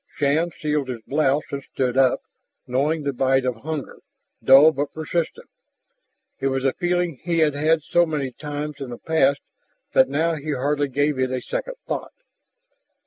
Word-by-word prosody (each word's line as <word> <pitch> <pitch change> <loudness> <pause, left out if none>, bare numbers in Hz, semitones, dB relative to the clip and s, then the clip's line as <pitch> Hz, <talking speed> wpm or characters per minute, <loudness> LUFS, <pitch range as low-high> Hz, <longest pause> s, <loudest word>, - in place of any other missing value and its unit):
Shann 150 +4 +1
sealed 150 -3 -1
his 120 -3 -5
blouse 145 0 +1
and 140 - -3
stood 130 -2 -2
up, 130 -1 +3 0.4
knowing 145 +5 0
the 140 -1 -1
bite 130 0 +2
of 125 -2 -1
hunger, 150 +2 -5 0.4
dull 140 +4 +8
but 145 -1 -4
persistent. 170 - -3 0.9
It 135 - 0
was 135 0 -1
a 135 - +2
feeling 175 -4 -1
he 170 -1 -1
had 155 -3 +3
had 155 +2 +2
so 175 +2 +3
many 145 -4 -2
times 150 +1 -5
in 135 -2 -6
the 120 - -6
past 140 -3 +2 0.5
that 130 0 +5
now 160 +4 +1
he 155 -1 -3
hardly 145 +2 0
gave 145 +1 0
it 130 0 +1
a 130 0 -2
second - - -4
thought. - - -4
145 Hz, 170 wpm, -23 LUFS, 135-160 Hz, 0.9 s, dull